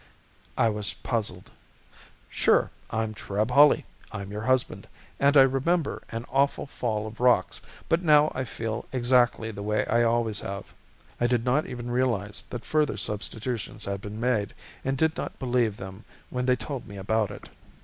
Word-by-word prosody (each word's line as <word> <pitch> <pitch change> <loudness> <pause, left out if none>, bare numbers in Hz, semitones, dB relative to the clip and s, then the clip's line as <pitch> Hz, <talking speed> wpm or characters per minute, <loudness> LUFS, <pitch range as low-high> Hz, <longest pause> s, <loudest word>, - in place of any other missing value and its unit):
I 115 - +4
was 105 -2 -2
puzzled. 105 -7 -3 0.8
"Sure, - - +2 0.2
I'm 110 -1 -1
Treb 105 +2 -2
Hawley, 145 +3 +6 0.3
I'm 100 0 -6
your 105 +1 -4
husband, 130 +2 0 0.3
and 140 +1 +5
I 135 - +10
remember 140 +5 +1
an 115 +1 -5
awful 140 +1 +2
fall 110 -6 -2
of 110 +1 -8
rocks 125 0 +3 0.3
but 165 +1 +2
now 150 -3 +5
I 130 - -2
feel 115 -2 -4
exactly 120 -3 +2
the 100 - -7
way 105 +1 0
I 120 - +2
always 115 -2 +2
have." 100 0 -6 0.5
I 120 - +3
did 120 -1 +1
not 130 +5 +2
even 120 -1 -5
realize 115 -5 0
that 120 - -6
further 150 -8 +1
substitutions 110 +1 -4
had 100 0 -3
been 105 +2 -7
made 115 -4 0 0.3
and 135 0 -1
did 160 +2 +2
not - - -5
believe 120 -5 +1
them 95 +3 -9 0.3
when 125 0 -2
they 125 - +5
told 125 +2 -6
me 100 - -9
about 105 +2 0
it. - - -10
120 Hz, 170 wpm, -27 LUFS, 105-130 Hz, 0.8 s, I